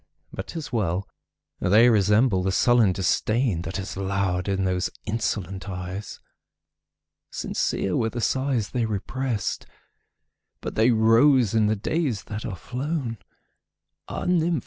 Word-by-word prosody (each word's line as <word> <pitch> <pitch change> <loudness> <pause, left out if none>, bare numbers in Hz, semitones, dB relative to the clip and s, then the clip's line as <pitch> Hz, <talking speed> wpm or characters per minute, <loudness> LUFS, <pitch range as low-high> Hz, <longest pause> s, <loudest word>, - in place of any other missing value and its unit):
But - - -6
't - - -7
is 145 -4 -6
well!—they 100 +2 0
resemble 105 -1 +4
the 95 +1 0
sullen 120 0 +4
disdainThat 95 0 0
has 100 +1 -4
lowered 95 -1 -1
in 95 -1 0
those 90 -1 0 0.2
insolent 100 -3 -3
eyes. 90 +2 -6 1.1
Sincere 95 - -1
were 115 -2 +1
the 120 - -5
sighs 130 -2 0
they 120 -2 0
represt, 110 0 -3 0.9
But - - -5
they 110 +2 +3
rose 115 +1 +4
in 110 -2 +3
the 110 - +2
days 120 - -1
that 110 +1 -5
are 100 - -4
flown! 125 - -4 0.9
Ah, - - -5
nymph! 170 -3 +2
110 Hz, 125 wpm, -25 LUFS, 95-125 Hz, 1.1 s, resemble